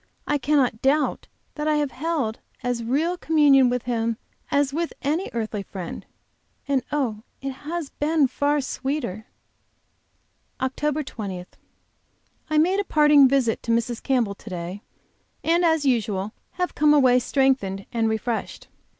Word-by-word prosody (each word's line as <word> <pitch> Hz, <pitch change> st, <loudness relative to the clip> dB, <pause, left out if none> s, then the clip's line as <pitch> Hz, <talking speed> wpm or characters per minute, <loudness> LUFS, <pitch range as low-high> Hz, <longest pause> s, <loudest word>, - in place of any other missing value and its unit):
I 295 Hz, 0 st, 0 dB
cannot 265 Hz, -5 st, +1 dB
doubt 285 Hz, +2 st, +1 dB, 0.3 s
that 300 Hz, 0 st, -3 dB
I 305 Hz, -, +3 dB
have 295 Hz, -2 st, 0 dB
held 285 Hz, -7 st, -2 dB, 0.2 s
as 245 Hz, -1 st, -1 dB
real 310 Hz, +10 st, 0 dB
communion 285 Hz, -5 st, +5 dB
with 250 Hz, -1 st, -1 dB
Him 230 Hz, -2 st, -1 dB, 0.3 s
as 280 Hz, -1 st, +1 dB
with 335 Hz, +2 st, -2 dB
any 310 Hz, +7 st, 0 dB
earthly 220 Hz, -3 st, -3 dB
friend 185 Hz, -3 st, -7 dB, 0.6 s
and 275 Hz, -2 st, +2 dB
oh, 245 Hz, -8 st, -1 dB, 0.2 s
it 275 Hz, 0 st, -4 dB
has 300 Hz, +3 st, -5 dB
been 300 Hz, -1 st, +2 dB
far 290 Hz, +3 st, +1 dB
sweeter! 260 Hz, -6 st, -3 dB, 1.3 s
OCT. 290 Hz, +3 st, -1 dB
20. 195 Hz, -8 st, -6 dB, 1.0 s
I 310 Hz, -, +1 dB
made 365 Hz, +6 st, +3 dB
a -, -, +1 dB
parting 295 Hz, -5 st, +6 dB
visit 255 Hz, -4 st, +1 dB
to 230 Hz, -, -2 dB
Mrs. 230 Hz, 0 st, 0 dB
Campbell 245 Hz, -7 st, +1 dB
to 210 Hz, -, -12 dB
day, 180 Hz, +2 st, -5 dB, 0.6 s
and, 340 Hz, +2 st, +3 dB
as 320 Hz, -3 st, +3 dB
usual, 215 Hz, -5 st, 0 dB, 0.2 s
have 360 Hz, 0 st, -2 dB
come 300 Hz, 0 st, +4 dB
away 255 Hz, -3 st, +5 dB
strengthened 245 Hz, -8 st, +1 dB
and 225 Hz, -1 st, +1 dB
refreshed. 220 Hz, +1 st, -3 dB
265 Hz, 140 wpm, -24 LUFS, 230-300 Hz, 1.3 s, parting